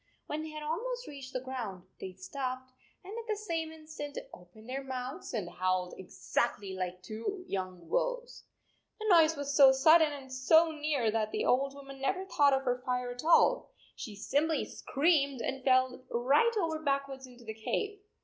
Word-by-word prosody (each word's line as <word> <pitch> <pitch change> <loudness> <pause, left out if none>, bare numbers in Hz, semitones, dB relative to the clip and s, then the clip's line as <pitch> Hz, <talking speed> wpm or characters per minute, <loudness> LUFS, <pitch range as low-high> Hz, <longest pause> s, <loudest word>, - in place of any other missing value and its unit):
When 300 +1 -3
they 315 - -6
had 305 0 -7
almost 485 +11 -3
reached 275 -3 -8
the 255 - -2
ground, 245 -8 -5 0.2
they 190 - -6
stopped, 255 +7 -5 0.3
and 390 +4 -8
at 465 0 -6
the 430 - 0
same 335 -6 -3
instant 310 -2 -8 0.2
opened 180 +6 -14
their 270 +2 -4
mouths 260 +5 -5
and 210 -7 -2
howled 185 0 -1
exactly 195 +1 -2
like 185 -1 -4
two 230 - -5
young 185 -3 -4
wolves! - - -2 0.5
The 435 - -5
noise 325 -3 +6
was 285 0 -3
so 275 -2 +9
sudden 310 +4 +6
and 270 -2 -8
so 320 +6 +5
near 300 -4 -1
8 220 - +3
that 215 -1 0
the - - -1
old 275 +2 +2
woman 275 -1 -10
never 375 +6 0
thought 295 -6 +4
of 270 0 +1
her 250 -1 0
fire 250 -1 -1
at 245 +3 -7
all. 420 +9 +4 0.3
She 215 -6 -7
simply 295 +9 0
screamed 280 -3 +1
and 265 +2 -3
fell 255 -1 +3
right 275 - +3
over 325 -5 0
backwards 275 -3 -2
into 245 -1 -15
the 220 - -5
cave. 410 - -2
275 Hz, 180 wpm, -31 LUFS, 245-315 Hz, 0.5 s, so